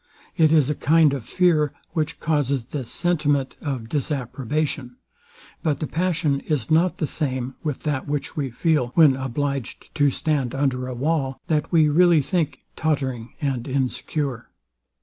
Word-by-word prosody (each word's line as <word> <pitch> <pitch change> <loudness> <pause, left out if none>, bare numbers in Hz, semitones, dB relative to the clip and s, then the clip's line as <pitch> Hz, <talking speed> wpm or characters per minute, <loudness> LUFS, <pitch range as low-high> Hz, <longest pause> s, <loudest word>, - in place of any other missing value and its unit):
It 155 -1 +4
is 155 -5 +5
a 150 - +1
kind 155 +1 +4
of 135 -4 -3
fear, 160 -5 +2 0.2
which 160 0 -2
causes 140 -5 0
this 130 -2 -5
sentiment 145 -5 0
of 130 -6 -3
disapprobation; 140 -1 -2 0.7
but 150 -5 0
the - - -1
passion 165 -4 0
is 140 -6 -2
not 170 +3 +3
the - - 0
same 130 -4 -2
with 150 -4 -3
that 145 -3 -2
which 145 -1 -3
we 140 -3 -1
feel, 145 +1 +1
when 155 -5 +6
obliged 135 0 -3
to 145 -2 +3
stand 140 -3 -1
under 130 -2 0
a 130 - -5
wall, 135 0 -1
that 155 -2 0
we 160 -3 +5
really 165 0 +5
think 165 -1 -1
tottering 130 -6 -2
and 135 -4 -1
insecure. 135 -1 -2
145 Hz, 150 wpm, -23 LUFS, 130-155 Hz, 0.7 s, when